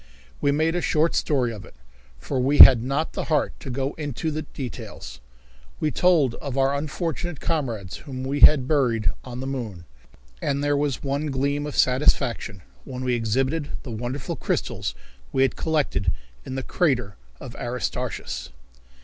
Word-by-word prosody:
We 140 - +3
made 160 +3 +1
a 175 - 0
short 160 +1 +2
story 125 -6 +1
of 105 - -9
it, - - -15 0.4
for 130 - -3
we 135 +3 +2
had 125 -4 +11
not 140 +6 -1
the - - -3
heart 150 -3 +1
to - - -8
go 135 +2 -2
into 150 +2 -3
details. 135 -5 -8 0.6
We 155 - 0
told 160 -9 +3
of 140 -2 -4
our 135 +1 +3
unfortunate 155 +2 -3
comrades 115 - -2
whom 130 -3 -7
we 140 +2 -2
had 140 -4 +7
buried 125 -8 +2
on 125 -1 -7
the - - -4
moon, 115 -10 -5 0.6
and 140 0 -1
there 145 0 +2
was 145 -3 -1
one 140 +2 -1
gleam 140 +1 -1
of 150 - -6
satisfaction 125 - +2 0.2
when 130 -1 -6
we 125 -1 +1
exhibited 130 +7 0
the 125 - -7
wonderful 120 +4 -4
crystals - - -2 0.4
we 135 - +3
had 135 - +1
collected 145 - 0 0.4
in 130 - -4
the 135 - -3
crater 125 - 0 0.2
of - - -9
Aristarchus. - - -4
135 Hz, 160 wpm, -24 LUFS, 125-150 Hz, 0.6 s, had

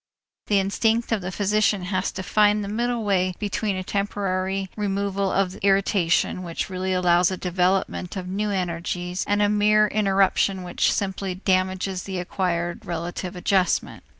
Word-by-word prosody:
The 205 - +3
instinct 225 +4 +1
of 220 -3 +1
the 180 +1 -4
physician 205 0 +1
has 185 0 -1
to 190 - -5
find 210 +2 +3
the - - -5
middle 235 +2 -1
way 185 -3 +1
between 205 0 -2
a 185 - -3
temporary 195 -1 -2
removal 200 -1 -1
of 190 -2 +1
irritation 195 -2 +2
which 175 +2 -4
really 185 0 -2
allows 180 0 +3
a 185 - -3
development 180 0 0
of 180 -1 -5
new 205 +3 -2
energies 180 -1 -2
and 205 0 +2
a - - +4
mere 210 +1 +4
interruption 195 -2 +2
which 175 - +1
simply 190 -1 -2
damages 185 0 0
the 190 -1 -5
acquired 175 -1 -2
relative 175 +2 -4
adjustment. 185 0 0
190 Hz, 150 wpm, -24 LUFS, 180-205 Hz, -, a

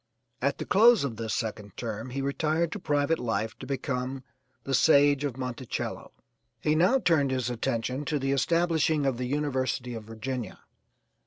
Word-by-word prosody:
At 140 +2 +1
the - - -5
close 225 -2 +6
of 125 -6 -3
this 110 -1 -3
second 105 -3 -4
term 115 +1 -4
he 135 +2 -3
retired 155 +4 0
to 210 - -4
private 150 -1 +1
life 110 -2 -2
to 130 - -8
become 130 -1 -3 0.4
the 135 - -3
'Sage 145 0 +5
of 135 -4 -2
Monticello.' 125 -1 -4 0.5
He 150 - +1
now 180 +11 +4
turned 165 - +2
his 130 -2 -1
attention 125 +2 -2
to 150 +1 0
the 135 0 -1
establishing 160 0 +2
of 135 -3 +1
the 125 - -2
University 130 -3 -1
of 110 -2 -7
Virginia. 115 0 -5
135 Hz, 165 wpm, -28 LUFS, 125-150 Hz, 0.5 s, close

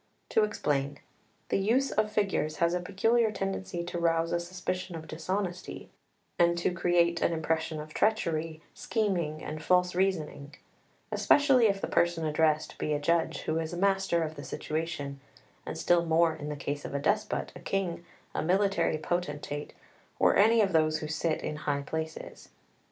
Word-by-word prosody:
To 220 - +3
explain: 145 -9 -1 0.5
the - - +2
use 240 +8 +2
of 215 0 +1
figures 195 -8 0
has 170 +2 +2
a 180 - +1
peculiar 225 +5 +2
tendency 195 -3 -3
to 175 0 -4
rouse 165 0 +1
a 175 - +1
suspicion 180 0 -4
of 160 -1 -8
dishonesty, 180 +3 -4 0.5
and 170 0 +4
to 170 - +1
create 170 -1 +2
an - - +2
impression 160 -1 -1
of 150 0 -8
treachery, 165 -7 0
scheming, 175 -9 -1
and 155 - -5
false 180 +2 +3
reasoning; 165 -6 -1 0.6
especially 270 -5 +5
if 200 -1 0
the - - -1
person 170 -1 +1
addressed 155 0 +1
be 150 - 0
a 145 - 0
judge, 165 +3 +1
who 160 +1 -1
is 160 +1 -4
master 195 -2 +2
of 155 -1 -4
the 145 - -9
situation, 155 -4 -4 0.5
and - - -4
still 175 -1 +3
more 165 0 +3
in 145 - -6
the 150 - -3
case 145 +1 -4
of - - -5
a - - +1
despot, 210 +7 0
a - - -8
king, 185 -3 -2 0.3
a - - -1
military 185 -2 +2
potentate, 150 -3 -3 0.5
or - - +4
any 225 +2 +5
of 195 -3 +1
those 155 -1 +3
who 155 - -5
sit 155 +1 -1
in 150 - -3
high 145 -2 -1
places. 160 +2 -6
170 Hz, 170 wpm, -29 LUFS, 155-190 Hz, 0.6 s, especially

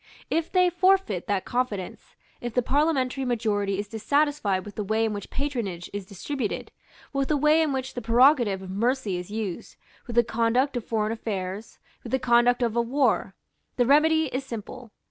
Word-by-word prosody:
If 330 0 0
they 365 -1 +4
forfeit 365 - +2
that 200 -2 -1
confidence, 240 -7 -3 0.3
if 240 -2 -5
the 250 - +3
parliamentary 270 -1 +1
majority 210 -5 0
is 205 +1 -3
dissatisfied 225 -3 0
with 205 - -9
the 210 - -3
way 220 +3 +1
in 220 - -1
which 205 - -6
patronage 235 -12 -4
is 200 -2 -5
distributed, 220 +4 -4 0.4
with 275 -1 0
the 305 - +2
way 300 +3 +4
in 310 -2 +1
which 265 -1 -3
the 245 - -5
prerogative 235 -4 +4
of 185 - -7
mercy 225 -1 0
is 180 +1 -7
used, 210 -4 -5 0.3
with 240 - -6
the 240 - +6
conduct 235 +4 +1
of 240 - -2
foreign 215 -1 -1
affairs, 205 -2 -5 0.2
with 235 - -9
the 265 - +3
conduct 245 0 +3
of 230 -1 0
a 235 - +3
war, 260 +4 +1 0.4
the 245 - +2
remedy 315 +4 +4
is 260 +2 -2
simple. 240 0 -8
240 Hz, 185 wpm, -26 LUFS, 210-275 Hz, 0.4 s, the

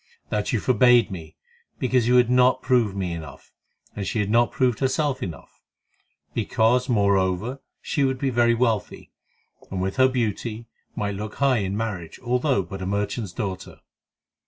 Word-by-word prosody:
"That 105 -1 -1
you 115 - +1
forbade 125 0 +4
me 80 -4 -8 0.4
because 125 -2 +1
you 125 - +4
had 125 -2 +5
not 125 0 +4
proved 120 -6 +2
me 90 -3 -2
enough, 80 -5 -10 0.4
and 100 - -4
she - - -2
had 105 -1 0
not 120 +1 +3
proved 125 -4 +1
herself 140 0 0
enough; 85 -7 -8 0.7
because, 125 +3 +1
moreover, 100 +3 +1 0.2
she 145 - 0
would 130 -1 +1
be 135 0 -1
very 120 -1 +3
wealthy, 115 -5 -1 0.6
and 95 - -4
with 95 +1 -2
her 130 0 +6
beauty 115 -2 -2 0.3
might 100 0 -2
look 105 +1 -6
high 135 -4 +2
in 100 0 -2
marriage, 100 -7 -4
although 125 -3 +1
but 95 +2 -8
a 95 - -3
merchant's 100 +1 -2
daughter." 95 -3 -6
115 Hz, 160 wpm, -24 LUFS, 95-125 Hz, 0.7 s, her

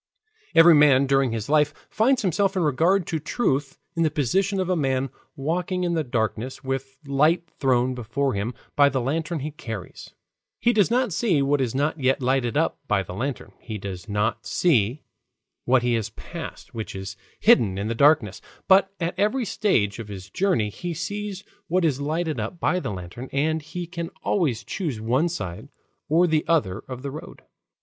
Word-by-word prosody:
Every 165 +1 +9
man 145 -3 +6
during 135 -2 +2
his 110 -2 -3
life 150 0 +3 0.2
finds 250 +3 +2
himself 195 +2 +1
in 185 - +1
regard 165 +6 +2
to 160 - -2
truth 145 - -1 0.2
in 165 - 0
the 160 - +3
position 190 - 0
of 185 - 0
a 185 - +1
man 135 -4 0 0.2
walking 175 +5 -1
in 175 -1 0
the 160 -2 +1
darkness 120 +2 -2
with 135 0 -4
light 150 +5 +2
thrown 130 -2 +2
before 125 +3 -1
him 105 +4 -3 0.2
by 145 -1 +6
the 135 - -1
lantern 155 +5 -2
he 150 +3 -4
carries. 115 - -8 0.4
He 240 - +3
does 210 -2 +3
not 245 -4 +1
see 170 -8 +2
what 140 0 +2
is 125 -1 -1
not 145 +3 0
yet 130 0 +2
lighted 125 -2 0
up - - +1
by - - +2
the - - -8
lantern; 130 +7 -4
he 110 -3 -6
does 95 0 -7
not 110 +3 -1
see 130 - +2 0.6
what 125 -1 +3
he 120 0 +1
has 110 -2 -1
passed 165 +6 -9
which 110 -4 -5
is 95 +1 -6 0.2
hidden 115 - +4
in 100 +2 -2
the 115 - -1
darkness; 125 -6 +3 0.3
but 195 0 +5
at 170 0 -1
every 225 +5 +1
stage 120 - +1
of 115 - -6
his 95 -2 -9
journey 150 - +1
he 175 - -5
sees 205 +3 -4 0.2
what 180 +1 +2
is 145 -3 0
lighted 155 +2 -1
up 175 - -4
by 180 - +1
the - - -4
lantern, 95 +7 -7
and 155 +3 0
he 175 +4 -6
can 170 -1 -5
always 140 - 0
choose 155 - -3
one 130 +10 +1
side 95 - -6 0.4
or 165 +4 +4
the 160 -3 +2
other 115 - +1
of 130 0 -7
the 140 - -4
road. 155 - -10
145 Hz, 190 wpm, -24 LUFS, 120-170 Hz, 0.6 s, Every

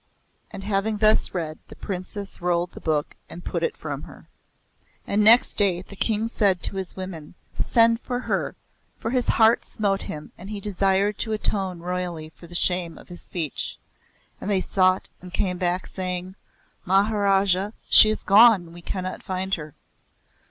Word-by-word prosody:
And 195 - -8
having 205 +2 0
thus 215 +1 +4
read 160 -4 -4
the - - -12
Princess 195 0 -6
rolled 175 0 0
the - - -11
book 150 -2 -1
and 175 - -10
put - - -2
it 470 0 -1
from - - -5
her. - - -13 0.8
And 210 +1 +1
next 230 +3 +6
day, 190 -4 +3
the 200 - -12
King 220 +2 0
said 200 -5 +1
to 195 - +1
his 190 -2 -5
women; 180 -5 -8 0.3
"Send 230 -1 +4
for 245 0 -3
her," - - -2 0.4
for 225 - -4
his 250 -1 0
heart 225 +1 +4
smote 200 -3 -1
him 150 -1 -7
and 190 +3 -9
he 210 -1 -4
desired 200 0 0
to 220 - -2
atone 190 -4 -2
royally 175 -3 -4
for 170 - -14
the 175 - -10
shame 175 -2 +1
of - - -15
his 175 - -8
speech. 165 -5 -3 0.6
And - - -4
they 195 -2 +2
sought 185 0 +2
and 180 0 -10
came 180 -1 0
back 180 0 0
saying; 185 0 -3 0.5
"Maharaj, 195 0 +3 0.3
she 215 - +8
is 215 - -2
gone. 200 -5 +6
We 175 - -11
cannot 185 +1 -4
find 190 0 -3
her." 155 -4 -4
190 Hz, 170 wpm, -24 LUFS, 180-210 Hz, 0.8 s, she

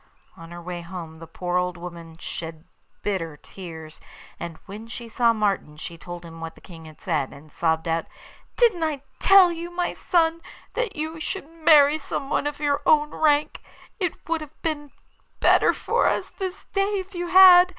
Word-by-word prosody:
On 165 0 -12
her 175 0 -8
way 175 0 -5
home 170 -2 -8
the 165 - -10
poor 175 +2 -2
old 180 0 -1
woman 170 -2 -9
shed 160 -1 -7 0.4
bitter 165 -7 -2
tears, 160 -3 -10 0.4
and 170 -2 -6
when 210 +3 -9
she 235 +1 -7
saw 230 +1 +3
Martin 200 -8 -1
she 170 +2 -7
told 175 +1 -9
him 165 0 -10
what 165 0 -6
the - - -16
King 165 -3 -12
had 155 -1 -13
said, 155 -7 -1
and 145 +2 -14
sobbed 160 +1 0
out: 165 0 0 0.5
'Didn't 450 -8 +4
I 300 -4 -2 0.2
tell 385 -2 +7
you, 340 +1 -5
my 350 0 -2
son, 330 -1 +1 0.3
that - - -2
you 315 +1 -4
should 380 0 -4
marry 310 -2 +5
someone 280 0 -2
of 295 -1 -4
your 290 -1 +1
own 300 0 +4
rank? 300 -1 +2 0.4
It 360 -4 -3
would 330 -1 0
have 305 0 -11
been 295 -3 -2 0.5
better - - +5
for 475 +2 +1
us - - 0
this 380 -1 -5
day 400 +1 0
if 385 +1 -6
you 350 -1 -3
had. 365 0 +9
235 Hz, 180 wpm, -24 LUFS, -, 0.5 s, had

